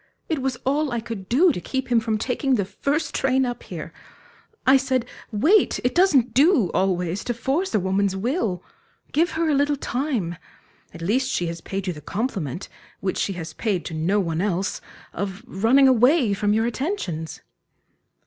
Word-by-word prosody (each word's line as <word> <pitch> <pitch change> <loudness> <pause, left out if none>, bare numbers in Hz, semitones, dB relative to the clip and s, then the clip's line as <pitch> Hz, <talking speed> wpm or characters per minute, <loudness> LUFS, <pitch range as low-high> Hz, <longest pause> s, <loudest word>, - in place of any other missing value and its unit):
It 315 -4 -1
was 265 -1 -1
all 290 +3 +1
I 240 - -1
could 220 -4 -7
do 325 +9 +5
to 180 - -4
keep 265 +4 -3
him 235 - +5
from 220 -1 -1
taking 260 +4 0
the 200 -5 0
first 290 - -2
train 265 0 +2
up 245 -1 -4
here. - - -8 0.7
I 265 - +7
said 260 -2 +1 0.3
Wait 320 - +3
it 250 - +1
doesn't 280 -10 +4
do, 275 - +4
always, 180 -1 0
to 240 - -2
force 270 - -1
a - - +4
woman's 190 +1 0
will; 210 - -1 0.5
give 330 +3 +2
her 325 +1 0
a 305 - +2
little 285 +1 +2
time. 245 - -2 0.5
At 170 - -9
least 250 +8 +1
she 175 - 0
has 165 0 -5
paid 195 0 -4
you 180 - -1
the 150 - -10
compliment, 190 - -3 0.3
which 190 -1 -2
she 195 - 0
has 165 -3 -7
paid 200 -7 -1
to - - -5
no 170 +6 +1
one 165 -3 -1
else 190 -1 -1 0.3
of 195 +1 -4
running 240 +8 +4
away 255 -1 +4
from 205 +1 0
your 220 +2 +2
attentions." 220 - -3
230 Hz, 180 wpm, -23 LUFS, 190-270 Hz, 0.7 s, I